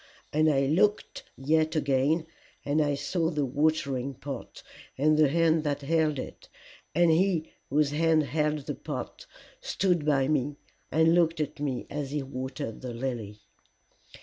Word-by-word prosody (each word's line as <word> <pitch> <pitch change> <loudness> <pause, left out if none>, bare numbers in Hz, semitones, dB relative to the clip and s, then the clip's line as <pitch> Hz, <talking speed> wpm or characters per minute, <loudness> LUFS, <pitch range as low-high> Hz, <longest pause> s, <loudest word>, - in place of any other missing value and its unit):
And 155 +1 +4
I 140 -2 +3
looked 185 +10 +1
yet 155 +4 +1
again, 145 +2 +1 0.4
and 145 +2 +2
I 145 -1 +1
saw 165 +4 -1
the 150 -4 -1
watering 140 -1 0
pot, 135 -1 -8 0.3
and 155 +3 +3
the 155 -1 +5
hand 165 0 +3
that 145 -1 -1
held 155 0 +1
it; - - -8 0.5
and 170 0 +5
he 170 -1 +1 0.2
whose 145 0 +2
hand 160 +1 +3
held 150 +2 0
the - - -3
pot - - -7 0.3
stood 185 - 0
by 140 -3 +2
me 145 -1 0 0.4
and 160 +1 +4
looked 170 -1 +3
at 150 0 -3
me 140 -4 -2
as 145 -2 -3
he 145 0 -2
watered 130 -2 -5
the 125 -2 -6
lily. 115 -5 -4
150 Hz, 150 wpm, -28 LUFS, 135-160 Hz, 0.5 s, the